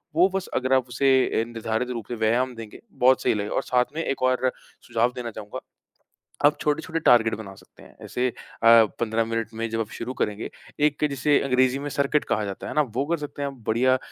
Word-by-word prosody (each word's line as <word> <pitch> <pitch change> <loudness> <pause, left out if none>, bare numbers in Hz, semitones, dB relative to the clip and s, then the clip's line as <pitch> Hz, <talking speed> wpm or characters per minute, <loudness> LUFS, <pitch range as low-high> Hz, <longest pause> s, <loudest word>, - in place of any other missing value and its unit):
वो 180 +4 +5
बस 190 - -2
अगर 130 +1 +1
आप 130 -1 +2
उसे 135 +3 0 0.3
ए - - 0
निर्धारित 115 +1 -3
रूप 115 -4 -5
से 120 - -4
व्यायाम 120 +3 +1
देंगे, 115 -2 -10
बहुत 130 +1 +3
सही - - +3
लगेगा 105 -1 -3
और - - 0
साथ 125 0 +2
में 165 - -1
एक 135 -4 -3
और 130 0 +2 0.4
सुझाव 120 +1 +1
देना 120 -2 -5
चाहूँगा। 105 -1 -7 0.9
आप 150 +1 +4
छोटे-छोटे 160 +2 -1
टार्गेट 115 -5 +4
बना 100 -3 -9
सकते - - -19
हैं। - - -17
ऐसे 125 +1 -1
अ, - - -10 0.3
15 115 0 +4
मिनट 115 -1 -2
में 115 +1 -3
जब 115 0 -2
आप 110 - -2
शुरू 120 +2 -4
करेंगे, 105 -3 -3 0.3
एक 150 0 +2
जिसे 140 +1 +2
अंग्रेज़ी 130 0 +2
में 145 - -4
सर्किट 140 +1 +1
कहा 105 - 0
जाता 100 -1 -6
है - - -5
ना, 150 - +3
वो 130 +1 -2
कर 170 +2 0
सकते 145 -1 -7
हैं 140 - -1
आप। 135 - -11
बढ़िया 130 +4 +3
125 Hz, 220 wpm, -24 LUFS, 115-140 Hz, 0.9 s, वो